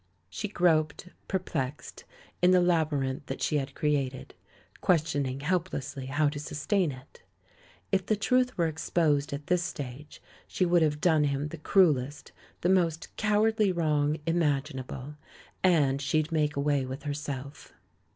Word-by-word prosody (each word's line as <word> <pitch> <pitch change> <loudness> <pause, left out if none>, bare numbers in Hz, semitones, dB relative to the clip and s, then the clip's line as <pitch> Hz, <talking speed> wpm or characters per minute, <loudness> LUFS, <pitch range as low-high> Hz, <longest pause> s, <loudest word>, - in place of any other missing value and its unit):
She 210 - -3
groped, 170 -3 +1 0.2
perplexed, 150 -7 -4 0.4
in 180 - +5
the 185 0 +6
labyrinth 150 -6 0
that 135 - -4
she 150 - +1
had 135 -1 -4
created, 140 -4 -1 0.5
questioning 145 -6 +1
helplessly 145 -5 -2
how 145 +3 +2
to 145 0 -6
sustain 155 +4 0
it. 130 0 -13 0.7
If 190 -2 +1
the 215 - +3
truth 250 +4 +1
were 170 - +2
exposed 155 -2 0
at 140 +1 -5
this 180 +1 +2
stage 145 -2 -7 0.3
she 185 - 0
would 175 -1 +3
have 150 -1 +1
done 160 -4 +4
him 140 +1 -1
the 170 - -7
cruellest, 145 -6 +2 0.3
the 175 - +1
most 170 -4 +1
cowardly 215 -1 +2
wrong 155 -3 +1
imaginable, 145 -4 -2 0.5
and 145 -7 +3
she'd 155 +3 0
make 150 -2 +1
away 140 -1 +1
with 130 +2 -6
herself! 145 -1 -6
150 Hz, 140 wpm, -28 LUFS, 140-175 Hz, 0.7 s, the